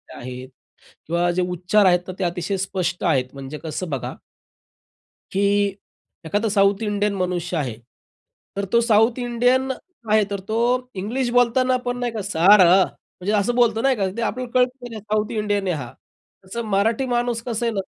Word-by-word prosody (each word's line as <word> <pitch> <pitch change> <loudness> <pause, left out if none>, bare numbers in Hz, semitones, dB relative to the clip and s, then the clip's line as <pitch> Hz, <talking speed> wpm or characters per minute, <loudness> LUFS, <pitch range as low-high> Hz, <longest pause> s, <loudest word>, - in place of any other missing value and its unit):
आहेत 125 +1 -8 0.6
किंवा 170 +2 +1
जे 180 +1 0
उच्चार 180 +3 +2
आहेत, 180 0 +3
ते - - 0
अतिशय 175 +2 -2
स्पष्ट 185 -2 -2
आहेत 135 -8 +1
म्हणजे 140 +2 -7
कसं 160 +3 -4
बघा 135 -4 -4 1.2
की 195 - 0 0.8
एखादा 205 +6 0
साउथ 200 +1 +3
इंडियन 205 -1 0
मनुष्य 180 -1 -2
आहे. 130 -8 -2 0.8
तर 200 - -1
तो 235 - +5
साउथ 230 +1 +3
इंडियन 245 +2 +1 0.4
आहे. 215 -1 +5
तर 200 0 -5
तो 215 +4 -4 0.5
इंग्लिश 245 +5 -1
बोलताना 255 +1 +3
पण 245 0 -1
नाही 245 -1 -2
का, 220 -2 -4
सॅड. 195 +1 +5
म्हणजे 185 +2 +1
असं 210 +4 +1
बोलतो 235 -2 +3
नाही 270 -1 +3
का, 195 -3 0
ते 235 - -2
आपल्याला 250 +2 -3
कळत, 250 0 +4
की 245 - -6
नाही 220 -1 -7
साउथ 215 +1 -1
इंडियन 205 -2 0
आहे 175 - 0
हा. 125 -5 -7 0.6
तर 235 - -2
मराठी 220 +6 +2
माणूस 240 -1 0
कसा 235 0 -2
आहे 230 - 0
ना, 195 - 0
205 Hz, 170 wpm, -22 LUFS, 180-235 Hz, 1.2 s, तो